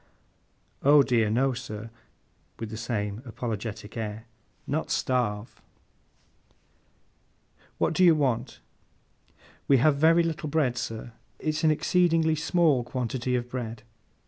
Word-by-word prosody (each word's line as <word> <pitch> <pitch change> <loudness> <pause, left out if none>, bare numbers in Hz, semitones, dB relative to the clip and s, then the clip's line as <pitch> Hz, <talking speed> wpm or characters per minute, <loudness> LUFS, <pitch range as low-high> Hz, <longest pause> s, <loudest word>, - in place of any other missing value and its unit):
'Oh 145 +1 +6
dear 115 -5 +2
no, 130 +4 +2
sir,' 115 -3 -7 0.7
with 115 -2 -6
the - - -5
same 105 -1 -3
apologetic 110 -3 -5
air. 110 -1 -5 0.4
'Not 155 +3 -2
starve.' 120 -4 -1 2.2
'What - - +1
do 185 - +3
you 170 -3 +7
want?' 130 -4 -1 1.1
'We 140 - +5
have 140 +3 +3
very 165 +3 +5
little 160 -2 -3
bread, 140 -5 +1
sir. 115 0 -5 0.2
It's 155 +1 -2
an 160 - +5
exceedingly 165 0 +2
small 160 -4 +2
quantity 125 0 -2
of 120 -1 -2
bread. 115 -3 -6
125 Hz, 120 wpm, -27 LUFS, 115-155 Hz, 2.2 s, you